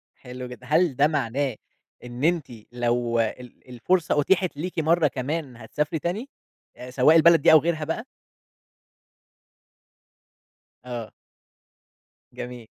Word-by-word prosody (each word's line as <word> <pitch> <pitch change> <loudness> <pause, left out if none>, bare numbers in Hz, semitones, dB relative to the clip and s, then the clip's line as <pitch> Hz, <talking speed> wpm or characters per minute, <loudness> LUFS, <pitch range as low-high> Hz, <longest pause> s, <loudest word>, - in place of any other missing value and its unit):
حلو 125 0 -9
جدًا. 125 0 -11
هل 155 0 +2
ده 145 - +4
معناه 140 -3 -1 0.5
إن 125 +2 -6
أنتِ 165 -2 +1 0.3
لو 120 -1 0
ال 120 +3 -5
الفرصة 155 +6 0
أُتيحت 180 +2 +1
ليكِ 175 +4 -5
مرة 160 +1 +3
كمان 135 0 -4
هتسافري 150 +8 -3
تاني؟ 190 - -4 0.5
آآ 125 0 -9
سواء 135 +5 +4
البلد 165 -1 +6
دي - - +6
أو 160 - +9
غيرها 160 0 -1
بقى؟ 160 - -4 2.8
آه. 120 -3 -7 1.2
جميل. 125 -1 -8
140 Hz, 115 wpm, -24 LUFS, 125-165 Hz, 2.8 s, أو